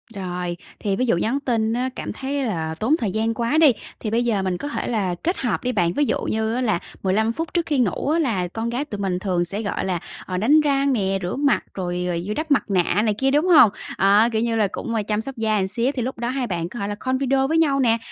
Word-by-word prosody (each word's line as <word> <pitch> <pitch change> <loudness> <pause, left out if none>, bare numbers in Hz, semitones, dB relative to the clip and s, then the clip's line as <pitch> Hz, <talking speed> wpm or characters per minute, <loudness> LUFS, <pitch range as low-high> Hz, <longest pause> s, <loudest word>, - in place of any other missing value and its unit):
Rồi, 180 -2 -4 0.2
thì 200 -2 -1
ví 255 - 0
dụ 230 - +2
nhắn 230 +10 0
tin 225 -5 0
á 250 +2 0
cảm - - -5
thấy 275 +1 -3
là 160 -7 -2
tốn 245 - +1
thời 220 - -2
gian 225 +3 0
quá 235 +6 0
đi, 315 -4 +7 0.3
thì 215 - -4
bây 235 +2 +2
giờ 215 -5 +1
mình 185 -1 -1
có 290 - -5
thể 290 - -3
là 200 -7 0
kết 350 +3 0
hợp 240 -6 -1
đi 250 - 0
bạn, 175 -7 +1
ví 290 - +2
dụ - - -1
như 220 0 -1
á 250 - -1
là 215 -8 +1 0.2
15 215 +4 +2
phút 325 +7 -5
trước 345 -2 +1
khi 295 -5 0
ngủ 245 +3 0
á 320 +2 +2
là 215 - 0
con 225 +6 -4
gái 250 +5 -2
tụi 205 -8 -6
mình 185 -2 -1
thường 180 -3 0
sẽ, 200 +5 -4
gọi 205 -3 -2
là, 180 -3 -1 0.3
ờ, 185 - -3
đánh 280 +11 +5
răng 280 -2 +2
nè, 195 -4 0
rửa 175 - -2
mặt 280 0 +2
rồi, 180 -1 -3
ờ, 175 - -1
vừa 210 - -2
đắp 310 +5 -4
mặt 285 - +4
nạ 190 +1 +2
này 215 -1 +1
kia, 270 +6 0
đúng 295 +4 +3
hông? 310 - +7 0.3
À, 205 +4 +5
kiểu 220 -1 0
như 230 -1 0
là, 215 -2 +2
cũng 230 - -4
chăm 210 0 0
sóc 265 +3 -6
da 220 -1 +1
một 190 -2 0
xíu 235 +7 0
thì 260 - -3
lúc 255 +3 -3
đó 235 0 -2
hai 255 -1 -2
bạn 170 -3 -3
có 240 - -8
thể 200 - -2
là 205 - -3
call 260 +4 -1
video 270 0 +1
với 320 +3 +1
nhau 290 -4 +3
nè, 230 -3 +3
225 Hz, 280 wpm, -22 LUFS, 195-265 Hz, 0.3 s, đi